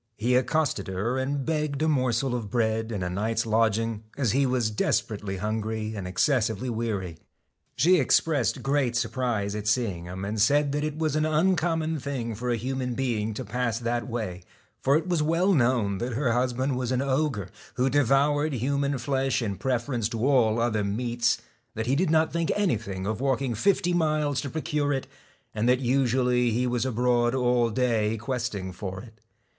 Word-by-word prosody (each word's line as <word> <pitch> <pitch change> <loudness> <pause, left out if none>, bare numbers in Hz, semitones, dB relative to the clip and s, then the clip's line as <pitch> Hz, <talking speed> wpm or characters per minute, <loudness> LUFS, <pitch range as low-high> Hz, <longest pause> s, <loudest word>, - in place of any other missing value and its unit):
He 120 +3 +1
accosted 130 -3 +1
her 105 +8 -1
and 135 +1 -2
begged 150 -3 -1
a - - +2
morsel 130 -3 +1
6 - - -1
of 115 -4 -4
bread 110 -1 0
and 100 -4 -3
a - - -1
night's 110 +4 -1
lodging, 115 0 +1 0.2
as 130 -7 +1
he 135 +2 +2
was 125 -4 0
desper 115 +1 0
.J^CK 105 - -3
ately 95 -2 -4
hungry 110 +1 -2
and 100 -4 -5
excessively 115 +3 +1
weary. 105 -7 -3 0.6
She 180 +3 +4
ex 130 - +5
^E^N - - -15
pressed 145 -7 0
great 135 -3 +1
surprise 115 -4 -1
at 105 0 -4
seeing 105 -7 0
him, 95 +2 -6
and 105 +1 -2
said 145 +5 +4
STALK - - -3
that 145 +1 -1
it 155 0 -3
was 155 -2 0
an 155 0 +2
uncommon 160 -1 +1
thing 125 -4 -3
for 120 +4 -4
a 120 - +2
human 125 +1 -3
being 110 -5 -1
to 130 - -5
pass 115 +1 -1
that 120 0 -2
way; 110 -7 -4 0.4
for 140 +2 +4
it 165 +2 -3
was 175 -3 +1
well 165 +6 +2
known 120 - +2
that 120 +1 -3
her 125 0 +1
husband 125 +2 0
was 125 -1 -2
an 130 +1 +1
ogre, 135 - -1 0.3
who 125 +1 +2
devoured 145 +3 +2
human 140 +3 0
flesh 135 +1 0
in 105 -5 -2
preference 120 -1 -1
to 115 0 -2
all 120 -5 +3
other 110 -3 +1
meats, 120 +3 0 0.4
that 110 0 -2
he 130 +3 +1
did 170 +3 +1
not 160 0 +2
think 170 -1 0
anything 110 - -1
of 110 +3 -2
walking 135 -2 0
fifty 180 - +1
miles 155 -5 +1
to 140 - -5
procure 150 -1 -1
it, 135 -2 -1 0.5
and 110 +3 0
that 125 0 +4
usually 125 -1 +2
he 120 +3 0
was 125 +1 0
abroad 120 0 +1
all 125 -2 +2
day 115 -2 +1
quest 120 0 -3
ing 95 -1 -5
for 95 +1 -6
it. 110 -3 -16
125 Hz, 195 wpm, -26 LUFS, 110-140 Hz, 0.6 s, ex